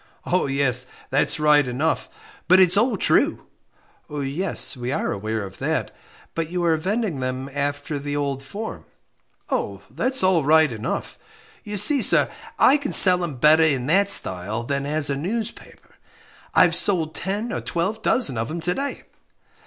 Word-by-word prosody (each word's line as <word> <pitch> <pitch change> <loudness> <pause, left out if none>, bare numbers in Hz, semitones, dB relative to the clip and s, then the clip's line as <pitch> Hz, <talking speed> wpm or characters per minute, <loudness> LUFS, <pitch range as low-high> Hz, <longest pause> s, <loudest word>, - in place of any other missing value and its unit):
"Oh, 180 -4 0
yes, 130 -2 0 0.2
that's 135 - 0
right 150 -2 +3
enough 140 +6 -2 0.4
but 185 +1 +5
it's 180 -1 +4
all 230 +5 +1
true." - - +1 0.6
"Yes; 145 +4 -1
we 125 0 -5
are - - -2
aware 110 +2 -4
of 95 -1 -11
that; - - -3 0.4
but 165 -1 -3
you 175 0 -3
are 165 -1 +2
vending 190 - -2
them 130 +1 -4
after 145 +1 -3
the 145 +1 -5
old 140 -2 -3
form." 205 +11 -8 1.1
"That's 260 -4 -1
all 185 -4 +2
right 155 0 +3
enough 115 +2 -5 0.4
you 210 -1 -5
see, 265 +8 +5
sir, - - +4 0.3
I 275 - +5
can 285 -1 -5
sell 180 -2 +6
'em 160 -5 -5
better 150 +5 +4
in 140 -6 +1
that 195 +7 +2
style 105 - +4
than 140 +2 -3
as 150 -1 +1
a - - -1
newspaper: 210 +10 -6 0.6
I've - - +4
sold 165 -6 +1
ten 210 +5 -4
or - - -4
twelve 190 +6 -3
dozen 180 - +1
of 115 - -3
'em 170 - -5
to 175 +2 -1
day." 280 +5 -5
155 Hz, 160 wpm, -22 LUFS, 135-190 Hz, 1.1 s, sell